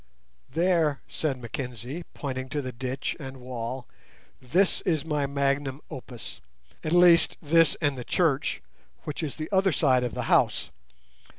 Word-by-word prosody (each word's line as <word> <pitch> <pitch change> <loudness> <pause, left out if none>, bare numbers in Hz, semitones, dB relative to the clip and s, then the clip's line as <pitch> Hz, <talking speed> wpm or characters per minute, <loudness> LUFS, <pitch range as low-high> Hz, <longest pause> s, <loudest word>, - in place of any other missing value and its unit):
"There," 165 -1 +2
said 145 -4 -2
Mr - - -14
Mackenzie, 125 - -5
pointing 130 -2 -4
to 150 +1 -1
the 130 - -4
ditch 130 +2 -3
and 135 -2 -7
wall, 125 0 -5 0.6
"this 175 +10 +2
is 160 -4 0
my 150 -3 0
magnum 140 0 0
opus; 125 -3 -8 0.4
at 155 - -2
least, 175 -1 +6
this 165 0 +4
and 145 -2 +2
the 125 - -6
church, 150 -1 +1 0.4
which 150 - -4
is 155 -4 -3
the 155 -1 -4
other 190 -1 +4
side 130 -5 +3
of 125 - -3
the - - -2
house. - - +2
140 Hz, 155 wpm, -27 LUFS, 130-160 Hz, 0.6 s, least